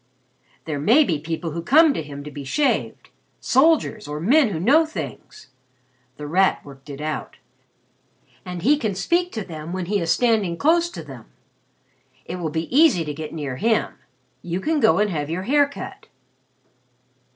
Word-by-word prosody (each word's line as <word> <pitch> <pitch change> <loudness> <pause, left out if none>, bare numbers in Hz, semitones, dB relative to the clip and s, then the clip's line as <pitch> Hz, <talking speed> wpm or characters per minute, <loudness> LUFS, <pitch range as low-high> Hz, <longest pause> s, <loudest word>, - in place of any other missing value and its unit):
"There 155 -3 -3
may 235 - +5
be 165 - -1
people 165 +2 -4
who 170 +2 -4
come 300 - +5
to - - -3
him 145 -2 -9
to 150 - -9
be 145 0 -8
shaved 280 - -1 0.3
soldiers, 265 -6 +2
or 150 +1 -5
men 250 - +4
who 170 -6 -4
know 275 - +4
things," 320 +6 -8 0.7
The 150 - -7
Rat 185 +6 +1
worked 135 0 -14
it 140 -1 -8
out, 155 0 -4 1.1
"and 180 -1 -7
he 290 +6 +4
can 215 -6 -2
speak 350 - 0
to 220 - -3
them 160 -2 -8
when 185 -1 -3
he 200 +3 0
is 170 -2 -3
standing 205 -3 +2
close 335 - +2
to 350 - -8
them. - - -11 1.0
It - - -6
will 170 -3 -3
be 160 +1 -3
easy 275 - +5
to 150 - -4
get 155 +1 -7
near 145 -5 -5
him. 225 - +1 0.5
You 175 +3 -3
can 310 +9 0
go 220 -4 +4
and 210 0 +1
have 150 -3 -3
your 175 +3 -3
hair 285 +5 +3
cut." 280 - -9
185 Hz, 175 wpm, -22 LUFS, -, 1.1 s, may